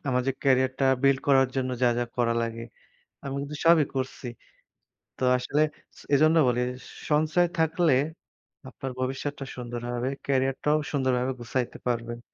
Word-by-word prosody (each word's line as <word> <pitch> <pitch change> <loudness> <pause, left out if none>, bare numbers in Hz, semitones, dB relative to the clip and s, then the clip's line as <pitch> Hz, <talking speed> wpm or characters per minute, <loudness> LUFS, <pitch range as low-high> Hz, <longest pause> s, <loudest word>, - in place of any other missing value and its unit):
আমার 125 0 +2
যে - - +2
ক্যারিয়ারটা 130 0 +2 0.2
বিল্ড 135 -1 +4
করার 135 -2 +5
জন্য 130 -1 0
যা, 125 - +6
যা 120 - +1
করা 115 -1 +2
লাগে, 115 0 -4 0.6
আমি 135 0 -5
কিন্তু 145 +1 -6
সবই 165 -3 +6
করছি। 130 0 -4 0.9
তো - - -4
আসলে 145 +4 0 0.4
স - - -13
এজন্য 155 +3 +5
বলি 125 0 +1 0.5
সঞ্চয় 155 +4 +3
থাকলে 160 -1 +2 0.8
আপনার 135 0 -6
ভবিষ্যৎটা 135 +2 -3
সুন্দর 120 -1 -6
হবে। 120 +2 -1 0.2
ক্যারিয়ারটাও 135 +2 +1
সুন্দরভাবে 130 -2 +1
গুছাইতে 125 +1 -3
পারবেন। 120 -1 -2
130 Hz, 140 wpm, -27 LUFS, 125-145 Hz, 0.9 s, যা